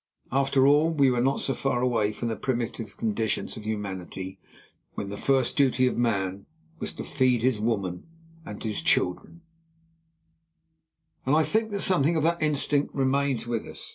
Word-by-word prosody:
After 135 0 +3
all, 145 +3 +5
we 140 -5 +3
were 120 -1 +1
not 135 +2 +1
so 135 - 0
far 130 -3 -1
away 115 -4 +1
from 120 - -4
the 115 - -1
primitive 115 -4 -3
conditions 110 -1 -1
of 105 -1 -8
humanity, 95 -3 -5 0.6
when 100 - -4
the 100 - -5
first 130 +3 +1
duty 130 -3 +3
of 125 - +1
man 100 -5 -1 0.3
was - - -3
to - - -5
feed 130 -4 +1
his 125 -4 +2
women 100 - -2 0.4
and 105 -8 -8
his 110 -2 -1
children, 90 - 0 1.8
and 135 +3 +2
I 160 - +4
think 220 +6 0
that 200 -1 -3
something 170 -3 +3
of 155 - +1
that 170 +1 +1
instinct 145 -1 +1
remains 135 -2 +1
with 120 -2 -3
us. - - -8
125 Hz, 170 wpm, -26 LUFS, 110-140 Hz, 1.8 s, all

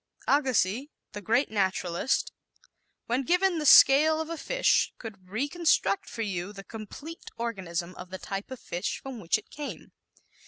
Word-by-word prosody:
Agassiz, 260 -3 +2 0.2
the 205 - -7
great 230 +7 +1
naturalist, 190 +1 0 0.7
when 245 +3 0
given 355 +4 +2
the 300 - 0
scale 305 +4 +7
of 320 +1 -4
a - - -2
fish - - +2
could 195 -5 -10
reconstruct 275 - +1
for 230 - -4
you 190 -2 -3
the 195 -1 -10
complete 230 +11 -9
organism 185 -7 -3
of 180 0 -9
the 190 - -6
type 195 +1 -6
of 260 -2 -7
fish 175 - -4
from 265 -3 -8
which 175 -1 +1
it 215 - -14
came. 295 -1 -7
230 Hz, 155 wpm, -28 LUFS, 190-290 Hz, 0.7 s, scale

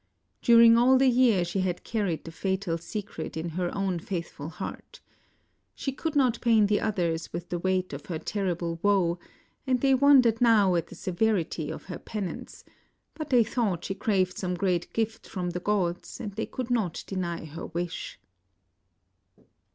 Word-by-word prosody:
During 230 0 +7
all 260 +2 +6
the 260 0 +4
year 235 -7 +4
she 175 +3 -2
had 185 -2 -1
carried 200 -8 -2
the 165 - -8
fatal 190 0 -2
secret 180 -4 -6
in 165 +2 -3
her 175 +2 -2
own 190 -3 0
faithful 165 -4 -5
heart. 165 - -8 0.8
She 270 - -3
could 310 +3 -4
not 255 -5 +2
pain 225 -3 +4
the 205 0 +1
others 175 -6 -1
with 170 +1 -6
the 175 - -2
weight 185 -1 0
of 140 0 -8
her 170 - -3
terrible 170 -2 -2
woe, 185 -4 +2 0.5
and 255 -1 +2
they 270 +1 +3
wondered 255 -4 +5
now 215 -6 +5
at 170 -1 0
the - - -11
severity 180 -5 -1
of - - -6
her 180 - -7
penance; 205 -5 -6 0.5
but 310 -2 -6
they 245 -3 +5
thought 215 -7 -1
she - - -2
craved 195 -4 0
some 180 -1 -2
great 180 -1 -1
gift 225 -2 -3
of 180 -1 -2
the 180 - -2
gods, 180 -3 -1
and 205 - -5
they 215 +3 -4
could 255 -1 -5
not 210 -9 0
deny 175 -4 -3
her 160 +1 -7
msh. 170 +1 -4
190 Hz, 170 wpm, -27 LUFS, 175-225 Hz, 0.8 s, During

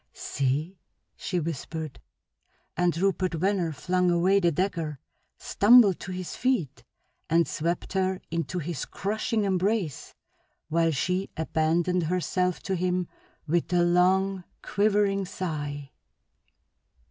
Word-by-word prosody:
"See!" 145 +7 -2 0.4
she 180 -3 -2
whispered, 160 -1 -5 0.7
and 175 -2 +1
Rupert 185 -1 0
Venner 180 -1 0
flung 180 +5 0
away 180 +3 +3
the 175 -3 +2
dagger, 165 -4 -2 0.4
stumbled 210 -3 +5
to 190 - -7
his 180 -2 -5
feet, 245 - -1 0.5
and 165 -1 +3
swept 170 +6 -2
her 190 -1 0
into 165 0 -2
his 170 -4 -3
crushing 215 +3 -2
embrace 190 - -1 0.5
while 165 +1 +2
she 180 +6 -1
abandoned 165 +3 +1
herself 180 +1 0
to 190 - -1
him 180 0 -1 0.4
with 170 +3 0
a 175 -1 +4
long, 185 +2 +2 0.2
quivering 200 -1 +1
sigh. 145 -7 -5
180 Hz, 110 wpm, -27 LUFS, 165-190 Hz, 0.7 s, stumbled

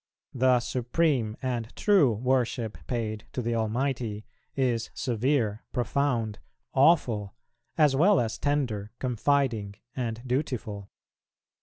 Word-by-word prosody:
The 130 -1 +4
supreme 125 -2 0
and 120 -3 -3
true 190 - +4
worship 120 -1 0
paid 110 -3 -3
to 125 - -2
the 120 +1 -1
Almighty 115 -1 -1 0.3
is 120 -4 0
severe, 120 -3 0
profound, 120 -3 0 0.3
awful, 130 - +3 0.4
as 150 -4 +5
well 190 +9 +5
as 115 -2 -2
tender, 125 -8 -1
confiding, 125 -4 0 0.2
and 120 -2 -3
dutiful. 125 -7 -3
120 Hz, 105 wpm, -28 LUFS, 110-135 Hz, 0.4 s, as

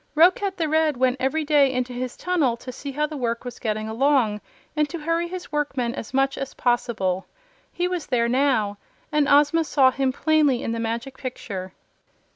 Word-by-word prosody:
Roquat 370 +4 +4
the 330 -3 0
Red 310 -2 +2
went 255 0 +2
every 305 +4 0
day 290 -3 +4
into 250 -1 -2
his 250 0 -4
tunnel 310 -10 +1
to 255 +2 -8
see 280 +3 -7
how 300 +2 0
the 305 0 -6
work 235 -2 -2
was 245 - -7
getting 215 -1 -2
along 230 -3 +2 0.3
and 300 -1 +1
to 340 - -5
hurry 330 +2 -1
his 355 -1 -7
workmen 270 -5 -1
as 220 - -7
much 270 +1 +1
as 270 0 -5
possible. 215 -6 0 0.4
He 355 0 -1
was 360 -3 -3
there 235 -3 +1
now, 235 -6 +1 0.3
and 300 -1 +2
Ozma 295 +3 +5
saw 270 -4 +4
him 265 0 0
plainly 295 -3 +2
in - - -2
the 230 - -2
Magic 235 +4 -4
Picture. 195 -7 -6
270 Hz, 190 wpm, -24 LUFS, 235-300 Hz, 0.4 s, Ozma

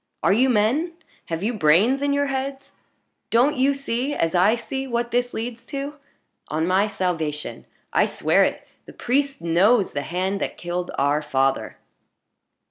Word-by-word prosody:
Are - - +4
you 255 +5 +3
men? 255 +10 +1 0.3
Have 165 +2 -4
you 230 +4 0
brains 210 - +3
in 285 0 +1
your 285 0 +2
heads? 270 0 -4 0.6
Don't 255 +6 +3
you 275 +1 +2
see, 275 +1 -2
as 165 -1 0
I 190 +5 +4
see, 265 +3 -5
what 235 -1 -2
this 245 0 0
leads 230 +1 -5
to? 280 +1 -5 0.5
On 155 +2 -1
my 190 +4 +2
salvation 170 -7 -3 0.3
I - - +4
swear - - +2
it - - -2 0.2
the - - -11
priest 275 0 -1
knows 190 +6 +3
the 140 - -1
hand 185 +6 -2
that - - -3
killed 175 +1 -4
our 145 +2 +2
father!" 135 -5 0
225 Hz, 160 wpm, -23 LUFS, 175-270 Hz, 0.6 s, Are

